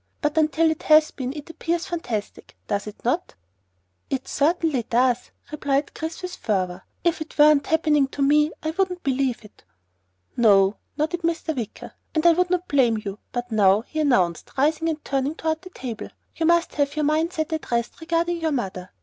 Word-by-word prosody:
"But 295 -1 -1
until 320 +1 +3
it 315 - -4
has 310 0 +5
been 260 -2 -4
it 295 +2 -8
appears 335 +1 -2
fantastic, 245 - -5
does 200 0 -2
it 210 - -10
not?" 315 +9 -1 0.7
"It 265 -1 -3
certainly 310 -2 +1
does!" 240 +2 +1 0.2
Chris - - -22
replied 285 -1 0
with 335 +3 -4
fervor. 185 -4 -1 0.2
"If 340 -1 +1
it 315 - -8
weren't 295 -1 +5
happening 300 -3 +3
to 275 +1 -2
me 300 +2 +4
I 315 - -1
wouldn't 365 0 -1
believe 260 -4 0
it!" 210 - -18 0.7
"No," 200 -4 +4 0.2
nodded 320 +3 -1
Mr. 330 -1 -1
Wicker, 230 -5 -6 0.2
"and 315 +1 +1
I 340 - +8
would 360 +2 +1
not 360 0 0
blame 245 -6 +3
you. 200 +1 -5
But 245 0 -4
now," 205 -1 +4
he 310 +6 -6
announced, 190 - +1
rising 310 +4 +2
and 310 -1 -4
turning 275 +2 -1
toward 320 -1 -2
the 370 - -11
table, 245 - -6 0.3
"you 325 - 0
must 340 0 +3
have 285 0 0
your 305 -1 0
mind 315 +4 +1
set 315 0 -2
at 315 - -4
rest 235 +5 -2
regarding 335 +1 0
your 320 -1 0
mother." 190 -9 -3
300 Hz, 185 wpm, -24 LUFS, 245-325 Hz, 0.7 s, I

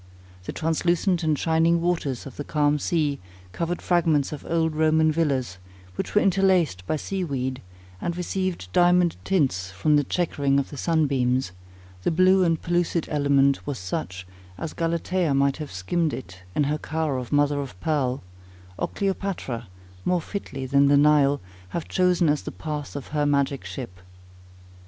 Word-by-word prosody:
The - - -4
translucent 170 +2 +1
and 155 -2 +1
shining 165 +2 +2
waters 165 -7 -1
of 135 - -9
the 145 - -3
calm 150 0 +1
sea 150 -2 0 0.3
covered 170 - -3
fragments 165 -5 +2
of 150 - -7
old 160 -1 +1
Roman 155 0 +3
villas, 135 - -1 0.3
which 90 - -5
were 210 - +5
interlaced 185 - +2
by - - +1
sea 190 +5 -3
weed, 130 -4 -3 0.4
and 175 0 -2
received 180 - -3
diamond 175 -1 +4
tints 135 - +1
from 125 +12 +2
the 145 - +3
chequering 140 -4 0
of 140 - -1
the - - -7
sun 160 +1 +2
beams; 130 -5 0 0.5
the - - +1
blue 185 +3 +4
and 165 -2 +2
pellucid 175 -1 0
element 140 -2 +2
was 140 -3 -2
such 90 0 -5 0.3
as 160 - -5
Galatea 170 -1 0
might 140 0 +2
have 150 -2 -6
skimmed 150 - -1 0.4
in 150 - +3
her 150 +2 -1
car 155 -4 -2
of 125 -2 -7
mother 145 0 +2
of 125 -10 -8
pearl; 135 -4 -1 0.6
or - - 0
Cleopatra, 190 - -3 0.4
more 180 -1 +2
fitly 155 -7 -5
than 140 +2 +4
the 140 0 +5
Nile, 145 -1 +4 0.3
have 170 - -4
chosen 180 -2 +2
as 150 0 +2
the - - -6
path 150 -3 -5
of 140 - -6
her 150 0 0
magic 140 -1 +1
ship. 95 -9 -7
150 Hz, 160 wpm, -25 LUFS, 140-170 Hz, 0.6 s, were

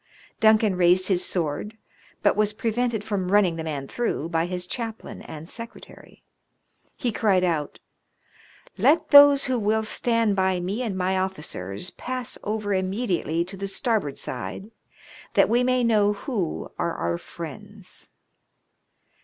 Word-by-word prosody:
Duncan 220 -2 +4
raised 180 +2 +4
his 185 -2 +2
sword, 175 +6 -2 0.5
but - - +4
was 210 0 +1
prevented 230 0 -1
from 200 -4 -2
running 195 -5 +4
the 165 - -4
man 145 -4 -4
through 200 - -2
by 165 0 0
his 180 0 -4
chaplain 225 +2 -5
and 160 +1 -9
secretary. 230 +4 -10 0.7
He 245 - -1
cried 200 -4 +2
out, 160 -5 -1 0.5
" - - -27
Let 315 +2 +3
those 285 -1 +9
who 255 -2 0
will 220 +1 +1
stand 230 -1 +1
by 190 -1 +1
me 190 +7 -3
and 215 -6 -2
my 185 +1 +1
officers 150 - -4
pass 255 0 -5
over' 210 -1 -2
immediately 185 -4 -1
to 190 +2 -9
the 195 +1 -4
starboard 200 - -1
side, 190 - -6 0.6
that - - +5
we 240 +2 +3
may 255 0 +2
know 210 -3 +3
who 200 - -3
are 170 -1 -1
our 85 0 -2
friends." - - -9
200 Hz, 145 wpm, -25 LUFS, 180-230 Hz, 0.7 s, those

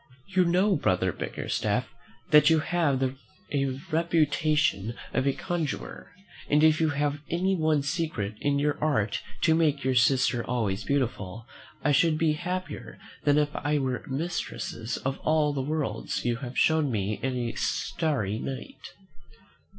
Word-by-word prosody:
You 185 -2 +3
know, 185 +4 +3
brother 95 - +1
Bickerstaff, - - -2 0.4
that 150 -1 +7
you 160 - +5
have 160 -5 +1
the 130 0 -1 0.7
reputation 155 - +1 0.2
of 130 - +1
a 140 - +3
conjurer; 170 -4 -4 0.4
and 150 +1 +4
if 155 0 +5
you 160 - +3
have 145 0 -1
any 185 +3 +1
one 155 -4 +2
secret 140 - -2
in 145 0 +1
your 145 +1 0
art 110 -10 +1 0.2
to 160 - +4
make 150 -4 +2
your 130 0 +1
sister 125 -1 +3
always 110 -5 -1
beautiful, 115 -5 -2 0.4
I 150 - +3
should 155 +2 +3
be 155 -1 +2
happier 180 +4 -5 0.3
than 145 0 +4
if 150 -1 +1
I 150 +1 0
were 130 -3 -1
mistress 135 -5 -3
of 135 +1 -3
all 155 -1 +2
the 140 - -1
worlds 150 -1 -2
you 120 -1 +1
have 125 0 -7
shown 160 -2 +3
me 105 -1 -1
in 130 -1 -1
a 120 -1 -2
starry 110 - -1
night." 135 - -7
145 Hz, 150 wpm, -27 LUFS, 125-160 Hz, 0.7 s, that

